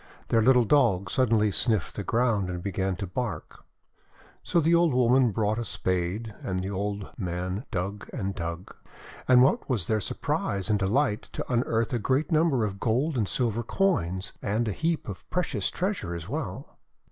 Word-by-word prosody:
Their 115 - +4
little 125 +1 +5
Dog 100 -9 +3
sud 130 -3 +2
denly 105 -3 +3
sniffed 110 -5 0
the 100 - -3
ground, 115 -4 +1
and 90 -1 -4
began 95 -1 -1
to 100 +2 -4
bark. 105 +3 -5 0.8
So 170 - +1
the 165 +1 +3
old 170 -5 +4
woman 125 0 +4
brought 110 +1 0
a - - -1
spade, 95 +3 -2
and 95 - -2
the 95 +2 -3
old 100 0 -3
man 90 +3 -3
dug 100 0 -4
and 100 -6 -3
dug. 85 -1 -6 0.5
And 125 -1 +7
what 135 - +2
was 115 -10 0
their 110 +2 0
surprise 100 +1 -2
and 105 - +2
de 95 - 0
light 120 0 +1
to - - -4
unearth 115 -1 +1
a 120 - +1
great 135 - 0
number 155 -7 +3
of 100 -1 -5
gold 130 +8 +1
and 110 -5 0
silver 120 -3 0
coins, 105 - 0
and 110 +3 0
a - - 0
heap 165 - -1
of 100 -4 -8
precious 150 - -1
treasure 185 - -2
as 85 -1 -7
well. - - -5
110 Hz, 180 wpm, -27 LUFS, 95-125 Hz, 0.8 s, And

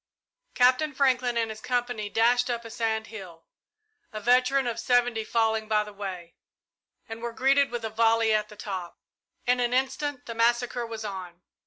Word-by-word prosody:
Captain 255 +4 +3
Franklin 255 -3 +2
and 225 -1 0
his 215 0 -9
company 245 -4 -2
dashed 245 +3 +3
up 235 -1 -3
a 230 - -8
sand 220 -1 -1
hill, 185 -7 -11 0.7
a 215 - -5
veteran 255 +4 +3
of 235 -2 -2
seventy 245 -3 +2
falling 220 -1 0
by 215 -1 +2
the 210 0 -11
way, 185 -4 -7 0.7
and 225 0 -8
were 235 0 -3
greeted 275 +3 +3
with 240 -2 -4
a - - -2
volley 225 0 +3
at 210 0 0
the 210 - -12
top. 190 -4 -6 0.5
In 250 0 +2
an 245 0 +1
instant 265 +1 -1
the 230 - -5
massacre 240 +1 +1
was 220 -1 -6
on. 180 -3 -7
230 Hz, 175 wpm, -27 LUFS, 215-245 Hz, 0.7 s, Captain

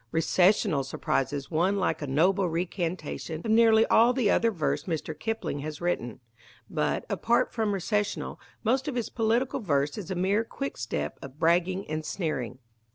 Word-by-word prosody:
Recessional 175 -1 +3
surprises 135 +1 -2
one 180 +5 +2
like 185 - 0
a 145 - -3
noble 180 +7 +2
recantation 170 -1 -3
of 220 - 0
nearly 225 0 +6
all 235 +2 +5
the 240 -6 +2
other 230 - +3
verse 165 -9 -1
Mr. 160 -2 -3
Kipling 220 -5 -3
has 150 +1 -5
written. 130 -11 -2 0.5
But, - - -1
apart 235 +1 +1
from 220 -3 0
Recessional, 205 +2 -2 0.2
most 255 +4 +1
of 285 - -2
his 240 -3 -2
political 235 +4 +1
verse 145 - 0
is 195 - -7
a 190 - -2
mere 195 +5 +2
quickstep 115 - -4
of 135 +1 -10
bragging 180 +4 +2
and 155 0 -3
sneering. 145 - -3
185 Hz, 160 wpm, -28 LUFS, 155-220 Hz, 0.5 s, nearly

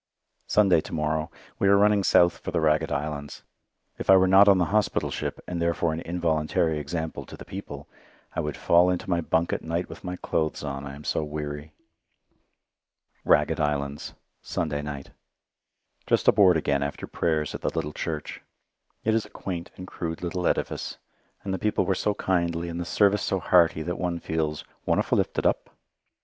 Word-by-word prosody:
Sunday 95 -6 +4
to - - -10
morrow. 75 0 -1 0.3
We 100 - +3
are 100 0 +6
running 105 0 +4
south 85 -1 +4
for - - -6
the - - 0
Ragged 80 0 +2
Islands. 70 0 -4 0.6
If - - -6
I 95 - +9
were 95 0 +4
not 95 +2 +7
on 100 -2 +7
the 90 - +2
hospital 105 -1 +1
ship, - - -4
and 85 -1 -3
therefore 85 -1 +1
an 80 - -3
involuntary 80 -2 0
example 80 +2 -4
to - - -10
the - - -10
people, 80 -7 -8 0.5
I - - -1
would 75 -2 -3
fall 85 +1 +4
into 90 -1 -2
my 85 -1 +2
bunk 80 +1 0
at - - -2
night 85 +2 -3
with - - -10
my 90 0 -4
clothes 80 -4 -2
on, 70 -1 -4
I 70 - -7
am 75 - -11
so - - -1
weary. 75 0 -5 1.5
Ragged 75 +2 +3
Islands 75 -1 -2 0.3
Sunday 75 -3 -2
night 70 -2 -7 1.0
Just - - +1
aboard 95 -4 +6
again 70 -2 0
after 70 +1 -3
Prayers 75 -3 -1
at - - -6
the - - 0
little 75 -2 -3
church. 75 -3 -5 0.6
It 110 - +2
is 110 -1 0
a - - -21
quaint 85 -3 -5
and 90 - -7
crude 85 -2 -5
little 90 +1 -1
edifice, - - -2 0.5
and 95 - -3
the 95 - -2
people 105 +2 +1
were 95 - +2
so 105 +3 0
kindly 85 -3 -1
and 85 +1 -5
the - - -4
service 100 +2 +3
so 95 - 0
hearty 85 -2 +3
that 90 +2 -4
one 90 -2 -1
feels 80 -2 -2 0.2
"wonderfu' - - +1
lifted - - -1
up." - - 0
85 Hz, 185 wpm, -26 LUFS, 75-90 Hz, 1.5 s, I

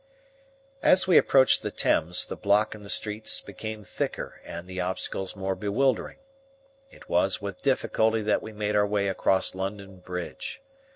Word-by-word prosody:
As 185 - +5
we 185 -2 +3
approached 130 -1 +4
the - - -3
Thames 90 +3 +2
the - - -6
block 105 +1 +2
in 105 - -11
the 100 - -10
streets 105 +1 +2
became 110 -1 -7
thicker - - -5
and 85 +1 -8
the 95 0 -4
obstacles 95 +1 -4
more 95 -1 -2
bewildering. 110 +6 0 0.7
It - - -17
was 90 +2 +2
with 100 -2 -7
difficulty 110 -5 +1
that 105 - +1
we 110 - -8
made 105 0 -2
our 105 0 +3
way 100 -1 0
across 95 0 +1
London 95 0 -6
Bridge. 90 - -6
100 Hz, 160 wpm, -26 LUFS, 95-110 Hz, 0.7 s, As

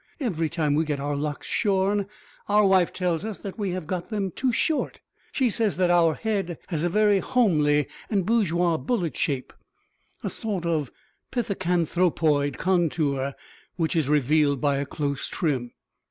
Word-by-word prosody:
Every 170 - -1
time 155 -3 0
we 155 +2 +2
get 150 -3 -2
our 145 +1 -2
locks 145 0 -3
shorn 200 -1 +1 0.4
our 210 0 +5
wife 190 -3 +4
tells 175 -2 -1
us 215 -2 -4
that 200 +2 -7
we 200 -2 -1
have 180 -2 -3
got 175 +1 -4
them 200 -4 -2
too 255 +8 0
short. 300 +6 0 0.3
She 260 -5 +1
says 215 -1 0
that 180 -1 +3
our 165 -3 +4
head 195 -7 -2
has 160 -4 -1
a 175 - +2
very 210 +1 +3
homely 150 - +2 0.2
and 195 -5 +1
bourgeois 180 -7 +2
bullet 185 -6 -1
shape, 140 -5 -2 0.7
a - - -1
sort 205 -7 -3
of 155 -6 0 0.4
pithecanthropoid 175 - +1
contour, 155 -7 0 0.4
which 165 -1 -1
is 155 -4 +1
revealed 150 0 +3
by 140 0 +1
a 140 0 -2
close 140 -2 -2
trim. 130 -8 -1
175 Hz, 160 wpm, -25 LUFS, 150-200 Hz, 0.7 s, our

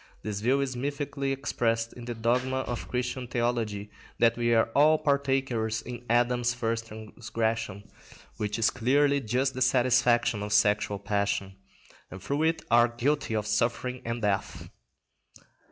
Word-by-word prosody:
This 105 -2 -3
view 130 +5 +2
is 130 -2 -2
mythically 140 +1 -3
expressed 115 -4 -1
in 120 - -10
the 120 -1 -4
dogma 125 +3 0
of 120 -2 -5
Christian 125 0 -3
theology 115 -4 -2 0.3
that 115 0 +4
we 120 0 0
are 115 0 +3
all 155 +2 +5
partakers 135 -6 0
in 120 0 -8
Adam's 120 0 +2
first 115 -1 -2
transgression 110 -1 -4 0.5
(which 105 0 -2
is 115 -1 +2
clearly 140 +3 +2
just 130 +4 0
the 130 - -6
satisfaction 120 -3 +3
of 105 0 -3
sexual 105 0 +2
passion), 100 -1 -1 0.6
and 95 - -9
through 140 +10 -2
it 160 +1 +1
are 120 0 +6
guilty 120 +1 -1
of 105 -1 -1
suffering 115 +4 -1
and 115 0 -4
death. 100 -1 -2
120 Hz, 145 wpm, -28 LUFS, 110-130 Hz, 0.6 s, are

